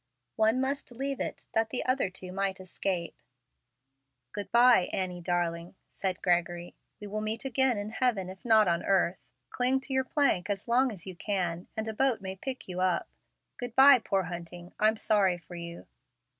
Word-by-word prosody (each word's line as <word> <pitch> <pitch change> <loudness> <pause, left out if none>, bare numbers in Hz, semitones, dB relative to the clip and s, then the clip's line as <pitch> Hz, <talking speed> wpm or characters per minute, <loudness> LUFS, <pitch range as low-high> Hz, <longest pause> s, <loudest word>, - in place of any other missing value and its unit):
One 220 +3 +3
must 270 0 -2
leave 270 +2 -3
it - - -4
that 225 0 +1
the 250 - -2
other 255 -6 +1
two 185 0 -7
might 195 0 -2
escape. 185 -1 -3 1.1
"Good 205 +6 -6
by, 235 -5 +6
Annie, 180 -2 -3
darling," 175 0 -2 0.2
said 185 -2 -3
Gregory. 175 -1 0 0.2
"We 210 - -7
will 210 +1 -4
meet 220 +4 -2
again 265 -2 +2
in 205 +1 -4
heaven 225 -6 +1
if 185 0 -10
not 220 -3 +5
on 170 -1 +1
earth. 190 -2 +1 0.3
Cling 255 +2 +2
to 265 - -3
your 265 0 +2
plank 255 -10 +1
as 200 +1 -3
long 250 +2 +3
as 190 -6 -8
you 185 -2 -7
can, 175 -3 -2
and 220 0 -2
a 220 - -3
boat 260 +1 +1
may 190 0 -6
pick 260 +6 -5
you 180 -1 -5
up. 185 -2 +1 0.5
Good 245 -2 -6
by, 270 -1 +8
poor 195 -4 0
Hunting, 175 0 -8
I'm 215 +1 +3
sorry 200 -5 +2
for 170 +1 -14
you." 170 0 -7
200 Hz, 185 wpm, -29 LUFS, 180-240 Hz, 1.1 s, by